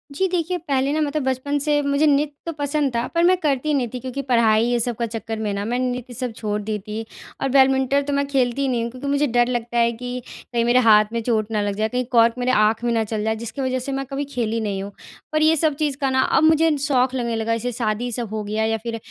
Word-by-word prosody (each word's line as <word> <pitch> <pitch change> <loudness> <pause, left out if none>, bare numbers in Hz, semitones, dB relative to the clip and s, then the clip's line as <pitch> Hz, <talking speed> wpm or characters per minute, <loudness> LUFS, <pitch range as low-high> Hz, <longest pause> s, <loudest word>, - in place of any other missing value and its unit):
जी 380 +4 +1
देखिए, 355 0 -1
पहले 280 -5 -1
ना 310 - 0
मतलब 300 0 -1
बचपन 265 +2 -1
से 295 0 +1
मुझे 280 +2 +1
नृत्य 290 0 +2
तो 335 - -2
पसंद 285 -1 0
था। 235 +1 0
पर 335 - +3
मैं 365 +2 +5
करती 300 -2 0
नहीं 260 -4 +1
थी 250 - -4
क्योंकि 260 +2 -5
पढ़ाई 225 -2 +4
ये 240 0 +1
सब 235 +1 -1
का 235 - -2
चक्कर 225 0 -5
में 210 -2 -2
ना 200 - -3
मैं 245 +2 -1
नृत्य 250 -1 -3
सब 245 0 -4
छोड़ 210 -1 -3
दी 210 0 -3
थी। 210 +2 -6 0.4
और 270 - 0
बैडमिंटन 265 +1 +4
तो 285 - -3
मैं 280 0 +1
खेलती 270 0 0
नहीं 245 -3 0
हूँ 235 - -4
क्योंकि 255 +3 -7
मुझे 285 +1 +2
डर 240 0 +2
लगता 240 -1 -2
है 235 0 +3
कि 250 +2 -5 0.3
कहीं 235 - +2
मेरे 240 +1 +4
हाथ 215 -3 +6
में 230 - -1
चोट 220 -2 0
ना 215 -1 0
लग 205 -1 -2
जाए, 215 +2 0
कहीं 250 +1 -1
कॉर्क 230 -1 +5
मेरे 250 +1 +1
आँख 215 -1 +2
में 240 - +1
ना 225 - +2
चल 215 0 -3
जाए 220 0 0
जिसकी 235 +4 -6
वज़ह 260 -1 -1
से 255 +2 -5
मैं 270 0 -2
कभी 275 +2 -4
खेली 230 -2 -1
नहीं 200 -3 -2
हूँ। 200 - -7 0.4
पर 310 - +1
ये 315 +1 +5
सब 310 -1 +1
चीज़ 290 -2 -1
का 270 - +2
ना 260 0 +2 0.2
अब - - +4
मुझे 320 0 +4
शौक 265 -2 +1
लगने 235 -2 -1
लगा 225 0 -1
जैसे 245 +2 -3
शादी 230 +1 -1
सब 235 -1 -4
हो 215 -1 -2
गया 215 +2 -2
या 225 0 0
फ़िर 230 +1 -5
250 Hz, 270 wpm, -22 LUFS, 225-280 Hz, 0.4 s, हाथ